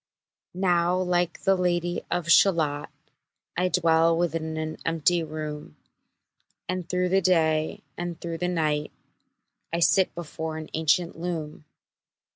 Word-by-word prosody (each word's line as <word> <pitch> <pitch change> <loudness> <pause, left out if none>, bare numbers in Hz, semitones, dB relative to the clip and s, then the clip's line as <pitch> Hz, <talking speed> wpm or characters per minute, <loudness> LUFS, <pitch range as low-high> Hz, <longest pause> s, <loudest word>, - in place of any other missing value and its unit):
Now 180 -1 +2
like 180 -1 0
the 195 - +4
Lady 175 -1 0
of 175 -1 -1
Shalott, 160 -5 +3 0.7
I 180 +2 +1
dwell 165 -2 +3
within 165 -2 -1
an 155 0 -4
empty 165 +1 +2
room, 150 - -6 0.9
And 180 -1 -3
through 180 0 0
the 190 +1 +3
day 160 -3 +1 0.2
and 175 -1 -4
through 165 -1 -5
the 180 - 0
night 155 -4 0 0.8
I 170 - -1
sit 185 +2 +3
before 160 -1 -5
an 155 -1 -8
ancient 165 +2 +1
loom. 160 -3 -5
170 Hz, 125 wpm, -26 LUFS, 160-180 Hz, 0.9 s, the